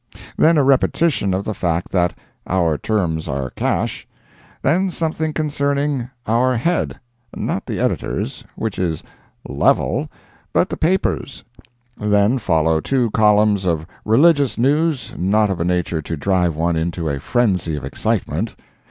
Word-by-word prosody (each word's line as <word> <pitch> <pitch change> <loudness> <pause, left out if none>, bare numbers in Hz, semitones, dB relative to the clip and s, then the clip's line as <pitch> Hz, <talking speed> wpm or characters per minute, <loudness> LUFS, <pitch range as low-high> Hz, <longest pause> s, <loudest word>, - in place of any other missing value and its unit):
then 165 +1 +4
a 145 - +4
repetition 135 - +2
of 95 +2 -1
the 110 - -3
fact 85 -3 -2
that 90 -2 +1 0.3
"our 85 -4 +1
terms 85 -4 -1
are 65 -1 -3
cash;" - - -2 0.6
then 185 +7 +2
something 160 -2 -2
concerning 140 -3 -1 0.2
"our 120 +3 +2
head"—not 120 -5 -3
the - - -3
editor's, - - -2
which 110 -3 -3
is 85 -4 -1 0.4
"level," - - +1 0.4
but - - +2
the - - -3
paper's; 170 -4 -1 0.5
then 105 +4 +2
follow 80 -5 +2
two 125 - 0
columns 105 -2 +3
of 80 -3 0 0.2
religious 140 +4 +4
news 145 +2 +1
not 105 +3 +2
of 90 -3 -3
a - - +2
nature 90 -2 0
to 80 +1 -5
drive 90 0 +1
one 85 +2 0
into 80 0 -2
a 70 -2 -2
frenzy 95 - 0
of 70 -3 -5
excitement. 80 +8 -2
105 Hz, 135 wpm, -20 LUFS, 85-135 Hz, 0.6 s, then